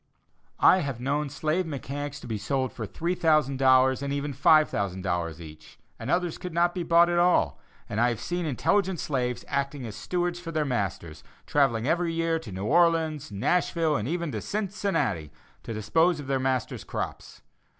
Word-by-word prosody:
I - - +7
have 140 -7 -3
known 145 +3 -1
slave 155 +5 -1
mechanics 140 0 -5
to - - -9
be 110 -3 -3
sold 130 +5 -1
for 110 - -5
$3,000 135 - +3
and 140 0 -3
even 140 0 -2
$5,000 95 - +2
each, 80 -1 -12 0.2
and - - -6
others 175 -2 0
could 180 -2 -7
not 175 0 +3
be 180 - -3
bought 170 0 +5
at 175 0 +1
all; 175 - +3 0.3
and 110 - -1
I 120 - +4
have 120 - -3
seen 175 -1 -3
intelligent 185 - +1
slaves 125 -4 -2
acting 140 -1 -2
as 110 -3 -7
stewards 175 -1 -2
for 170 -2 -7
their 155 -2 0
masters, 100 - -3 0.2
travelling 130 -5 +2
every 170 +1 +1
year 165 0 0
to 120 -10 -10
New 95 +2 -5
Orleans, 160 -1 +2
Nashville, 160 - +1
and 105 -1 -2
even 170 0 -2
to 110 -4 -4
Cincinnati, 190 - -2 0.3
to - - -7
dispose 160 - +2
of 145 - -7
their 135 0 0
master's 130 -2 -1
crops. - - -6
140 Hz, 170 wpm, -27 LUFS, 120-170 Hz, 0.3 s, I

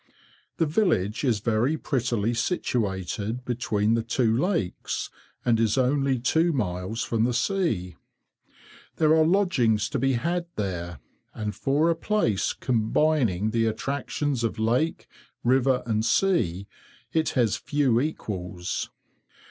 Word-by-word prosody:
The 165 - +2
village 145 - +1
is 115 -7 +1
very 120 +7 +1
prettily 120 -6 -1
situated 115 - -2
between 110 -3 0
the 115 - +2
two 115 0 +1
lakes, 165 - -2 0.3
and 115 -2 +3
is 115 +1 +2
only 135 +1 +2
two 160 +8 +2
miles 95 -2 -2
from 115 -1 0
the 120 0 +1
sea. 125 - -1 1.0
There 155 0 +4
are 160 - +5
lodgings 145 - +2
to - - -2
be 135 0 +2
had 170 +7 -1
there, 90 -5 -3 0.4
and 105 -1 -3
for 150 +8 +2
a - - 0
place 160 - 0
combining 115 - +1
the 115 0 +1
attractions 130 +3 -2
of 115 - -1
lake, 120 +9 0 0.4
river, 130 +1 +3
and 110 -2 0
sea, 115 - +1 0.5
it 160 -1 +2
has 115 -5 +3
few 140 -6 +1
equals. 90 - -4
120 Hz, 125 wpm, -26 LUFS, 110-145 Hz, 1.0 s, are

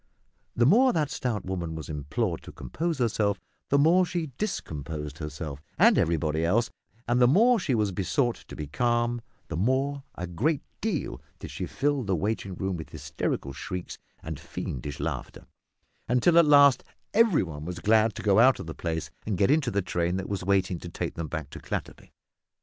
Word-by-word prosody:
The 120 - +3
more 245 - +6
that 150 -4 0
stout 115 -6 -2
woman 85 -3 -3
was 80 - -6
implored 75 -2 -2
to - - -10
compose 165 -1 -3
herself, 105 -5 +1 0.3
the 140 - +4
more 165 +6 +5
she 170 -4 -3
discomposed 75 - -4
herself, 75 -2 -6 0.2
and - - +6
everybody 80 -1 +1
else; 110 +7 +2 0.4
and 120 +1 +2
the 125 - +7
more 230 - +5
she 140 -8 0
was 105 -3 +1
besought 105 - 0
to - - -9
be 75 - -5
calm, 120 +8 0 0.3
the - - -3
more, 130 - +1
a 90 - -4
great 130 - 0 0.2
deal, 160 - -2 0.2
did - - -8
she - - -4
fill 145 -1 0
the 100 -5 0
waiting 100 +1 -2
room 95 0 -2
with 80 - -8
hysterical 70 - -3
shrieks 90 +6 -6 0.2
and - - -5
fiendish 70 +3 -5
laughter, - - -4 0.6
until 125 +8 +4
at 170 - +6
last 145 -2 +6 0.3
every 225 -6 +4
one 75 -4 -7
was 90 +2 -5
glad 110 +3 +3
to - - -6
go 100 0 +4
out 130 +3 +6
of - - -6
the 80 - -6
place 80 -2 -3 0.2
and 105 -4 0
get 100 - +3
into 150 -4 +2
the 100 -4 0
train 85 0 -1
that 95 - -4
was 100 -3 -3
waiting 95 -2 +1
to 90 - -8
take - - -4
them 85 -1 -4
back - - -5
to - - -8
Clatterby. - - -6
105 Hz, 190 wpm, -27 LUFS, 85-140 Hz, 0.6 s, the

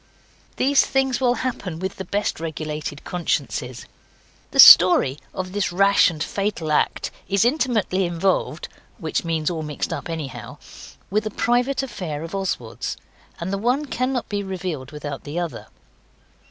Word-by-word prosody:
These 275 +1 +4
things 265 -1 0
will 245 -1 +3
happen 195 -9 -3
with 190 +2 -4
the 190 - -5
best 205 0 -2
regulated 155 -2 -5
consciences. 140 -7 -3 0.6
The - - -7
story 135 +2 +9
of 185 0 -5
this 205 -1 -1
rash 195 +2 +4
and 160 -2 -4
fatal 195 -6 -2
act 150 - 0 0.2
is 200 +2 +3
intimately 235 -8 +1
involved 175 -2 -1 0.3
which 160 -2 -2
means 165 -1 -1
all 165 -2 -3
mixed 150 -2 -3
up - - -6
anyhow 160 -5 -6 0.5
with 215 +2 0
a - - -2
private 245 +5 +1
affair 165 - -5
of 165 - -8
Oswald's, 185 - -3 0.4
and 175 +3 -3
the 195 - -1
one 250 +7 +1
cannot 255 -2 -2
be 205 -1 -2
revealed 180 -8 -5
without 145 -2 -6
the 150 +3 -6
other. 175 -2 -4
185 Hz, 150 wpm, -22 LUFS, 155-215 Hz, 0.6 s, story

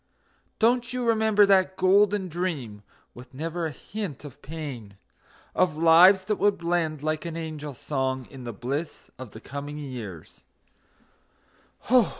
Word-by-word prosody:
Don't 240 +1 +2
you 250 -1 -2
remember 220 -2 +4
that 190 -1 +3
golden 200 +1 +3
dream, 155 - -4 0.3
with 125 +2 -13
never 165 +3 -3
a - - -5
hint 190 - -7
of 140 - -12
pain, 135 -10 -7 0.6
Of 175 -4 +1
lives 175 +4 +7
that 210 +1 0
would 205 0 +2
blend 170 -3 -1
like 155 0 -1
an 165 -1 -5
angel 155 -3 -6
song 130 -2 -2
in 135 -2 -10
the 120 - -5
bliss 135 +8 -5
of 130 -3 -8
the 110 - -11
coming 145 +4 -7
years? 120 - -9
160 Hz, 140 wpm, -26 LUFS, 135-190 Hz, 0.6 s, lives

